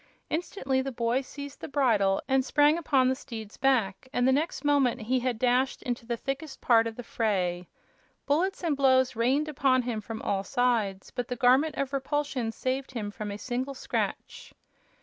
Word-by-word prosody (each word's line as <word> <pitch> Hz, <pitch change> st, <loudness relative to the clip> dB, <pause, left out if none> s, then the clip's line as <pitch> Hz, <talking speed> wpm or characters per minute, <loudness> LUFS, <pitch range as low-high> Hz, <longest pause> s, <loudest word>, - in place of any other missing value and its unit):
Instantly 300 Hz, -5 st, -1 dB
the 270 Hz, +1 st, -4 dB
boy 235 Hz, +1 st, 0 dB
seized 280 Hz, +1 st, -9 dB
the -, -, -5 dB
bridle 220 Hz, -9 st, +2 dB
and 265 Hz, -1 st, +3 dB
sprang 295 Hz, +3 st, +4 dB
upon 280 Hz, -6 st, +2 dB
the 260 Hz, -, +3 dB
steed's 225 Hz, -5 st, -8 dB
back, 250 Hz, -4 st, +1 dB
and 245 Hz, -2 st, +1 dB
the -, -, +5 dB
next 295 Hz, +3 st, -1 dB
moment 270 Hz, -4 st, +2 dB
he 250 Hz, +4 st, +1 dB
had 250 Hz, -2 st, -1 dB
dashed 255 Hz, +2 st, +1 dB
into 245 Hz, -3 st, -4 dB
the 235 Hz, -1 st, -1 dB
thickest 275 Hz, +3 st, -5 dB
part 230 Hz, -2 st, +4 dB
of 225 Hz, -, -6 dB
the 245 Hz, -, -7 dB
fray. 180 Hz, -7 st, -1 dB, 0.6 s
Bullets 360 Hz, +7 st, 0 dB
and 320 Hz, -4 st, +1 dB
blows 260 Hz, -2 st, +3 dB
rained 260 Hz, +7 st, +1 dB
upon 260 Hz, -3 st, +2 dB
him 235 Hz, -3 st, -3 dB
from 220 Hz, +1 st, -6 dB
all 195 Hz, -1 st, 0 dB
sides, 220 Hz, -5 st, 0 dB
but 245 Hz, -1 st, -4 dB
the 250 Hz, -, -3 dB
Garment 260 Hz, +6 st, +3 dB
of 275 Hz, 0 st, -2 dB
Repulsion 275 Hz, -3 st, -1 dB
saved 260 Hz, +3 st, -3 dB
him 210 Hz, -4 st, -4 dB
from 210 Hz, 0 st, -6 dB
a 200 Hz, -, -5 dB
single 255 Hz, +4 st, -3 dB
scratch. -, -, -4 dB
255 Hz, 185 wpm, -28 LUFS, 230-275 Hz, 0.6 s, the